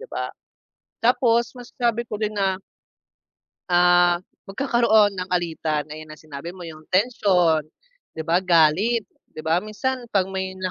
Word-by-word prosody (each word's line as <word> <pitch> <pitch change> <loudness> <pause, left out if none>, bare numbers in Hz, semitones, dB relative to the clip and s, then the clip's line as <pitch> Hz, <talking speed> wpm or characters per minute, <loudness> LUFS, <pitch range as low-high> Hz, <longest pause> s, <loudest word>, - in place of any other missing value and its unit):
'di 485 - -11
ba? - - -4 0.7
Tapos 235 -1 +3
masabi 240 -1 -2
ko 215 -2 -6
din 215 0 -2
na 190 -1 0 1.1
ah, 175 0 +4 0.3
magkakaroon 220 -2 +3
ng 180 0 -4
alitan, 160 -4 -1
gaya 155 +1 -9
ng 155 - -10
sinabi 155 +3 -9
mo 185 - -10
yung 155 -2 -10
tensyon, 185 -7 +2 0.5
'di 160 - -3
ba 170 +2 +2
galit, 185 +6 +3 0.3
'di - - -6
ba 160 +2 +2
minsan 245 +4 -3
'pag 195 -4 +2
may 190 0 -4
na 185 0 -3
185 Hz, 145 wpm, -23 LUFS, 165-225 Hz, 1.1 s, ah